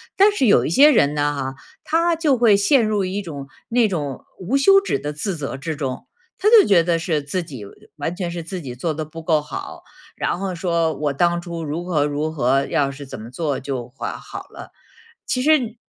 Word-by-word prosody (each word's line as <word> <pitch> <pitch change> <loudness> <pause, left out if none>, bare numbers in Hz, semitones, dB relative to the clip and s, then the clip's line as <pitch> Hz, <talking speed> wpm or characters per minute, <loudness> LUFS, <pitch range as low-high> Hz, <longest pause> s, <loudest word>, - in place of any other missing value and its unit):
但 405 +2 +6
是 275 -11 +1
有 205 - +5
一 - - -1
些 290 - +7
人 145 - +3
呢 145 0 +1
哈， 135 -1 -3 0.3
他 335 +2 +2
就 310 -5 +2
会 220 -4 +5
陷 235 +6 +4
入 205 -3 0
一 195 +3 -3
种 145 -7 -7 0.2
那 235 -2 +3
种 145 -8 -4
无 210 +9 0
休 390 +8 +6
止 395 - -1
的 150 +1 -4
自 170 +4 -3
责 140 -2 -4
之 155 +3 -4
中， 135 - -5 0.3
他 415 +3 +3
就 445 -5 +7
觉 180 -4 +5
得 165 -1 +1
是 165 -3 -1
自 175 +5 -3
己 135 -10 -9
呃， 100 - -11 0.3
完 160 +4 -3
全 175 -2 -3
是 170 -1 -5
自 180 +1 -6
己 125 -4 -7
做 155 +6 -2
得 155 - -4
不 165 +1 -10
够 155 -2 +2
好， 150 - -8 0.3
然 - - -1
后 195 -1 -3
说 170 -2 0
我 145 -2 -2
当 175 +3 +1
初 170 -2 -6
如 155 +3 -4
何 155 -5 +1
如 150 +2 -2
何， 135 -1 +1
要 140 -1 0
是 140 +1 -9
怎 130 - -8
么 115 - -9
做 145 -1 -2
就 130 -3 -4
会 130 - -5
好 - - -9
了， - - -11 0.6
其 255 - -1
实 310 +2 +5
你 235 -3 -6
165 Hz, 245 characters per minute, -21 LUFS, 145-205 Hz, 0.6 s, 些